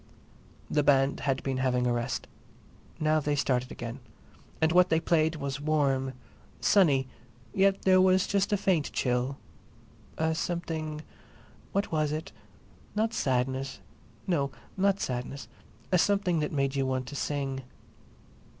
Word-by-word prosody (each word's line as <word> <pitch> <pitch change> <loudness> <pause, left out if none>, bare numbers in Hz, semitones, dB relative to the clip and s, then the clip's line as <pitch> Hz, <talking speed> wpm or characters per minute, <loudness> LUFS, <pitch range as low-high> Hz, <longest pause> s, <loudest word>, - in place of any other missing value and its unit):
The 150 - +2
band 135 -1 +3
had 135 -1 -1
been 135 -1 -1
having 125 -1 +1
a 120 - +2
rest. 120 +2 -2 0.7
Now 155 0 +3
they 145 0 0
started 125 -3 0
again. 120 +2 -6 0.6
And 160 0 +3
what 180 +1 +5
they 160 - +3
played 160 -1 +2
was 140 -1 -4
warm, 140 -3 +1 0.5
sunny, 145 -10 +4 0.5
yet 195 0 +3
there 185 -1 +6
was 185 0 +4
just 200 0 0
a 205 - +3
faint 185 -6 +1
chill—a 135 +5 -3
something, 160 -2 -3 0.7
what 200 +1 -1
was 155 -2 +1
it?—not 210 +7 -5
sadness—no, 130 - -2 0.3
not 195 +1 +2
sadness—a 130 +7 -4
something 195 -3 +2
that 150 - -1
made 140 -1 0
you 135 -1 +1
want 130 -1 -1
to 145 - -8
sing. 135 -2 -2
145 Hz, 125 wpm, -29 LUFS, 135-170 Hz, 0.7 s, there